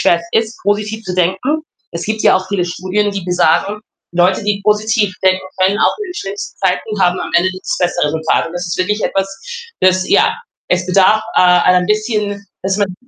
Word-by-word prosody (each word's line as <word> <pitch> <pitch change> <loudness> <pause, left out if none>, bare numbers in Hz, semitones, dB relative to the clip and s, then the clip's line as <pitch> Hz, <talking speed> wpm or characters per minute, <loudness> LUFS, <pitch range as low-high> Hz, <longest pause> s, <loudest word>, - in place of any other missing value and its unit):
schwer 170 -1 +3
es 225 - +3
ist, 230 - -16
positiv 210 +2 -1
zu 180 -2 -4
denken. 190 - 0 0.3
Es 170 - -4
gibt 220 0 -2
ja - - +5
auch 185 0 -4
viele 190 -3 -1
Studien, 185 +4 -1
die 200 -3 -5
besagen, 180 +3 +1 0.3
Leute, 180 +4 +2
die 205 -1 0
positiv 210 -1 +1
denken, 190 0 +3 0.2
können 190 +3 +2
auch - - +2
in 420 - -4
den - - -8
schlimmsten 200 - -6
Zeiten 195 +2 -1
haben 180 0 +2
am - - -5
Ende 180 +2 +3
das 185 0 -4
bessere 175 -3 +1
Resultat. 160 +2 0
Und 165 - -8
das 175 0 -4
ist 170 - -3
wirklich 210 +4 -1
etwas, 195 0 0 0.5
es 185 0 +3
ja, - - +3 0.3
es 180 0 +1
bedarf, 195 +4 +4
äh, - - +6
ein 180 0 +4
bisschen, 210 -1 -1 0.2
dass 190 +1 -1
man 200 -3 -1
190 Hz, 200 wpm, -16 LUFS, 180-210 Hz, 0.5 s, äh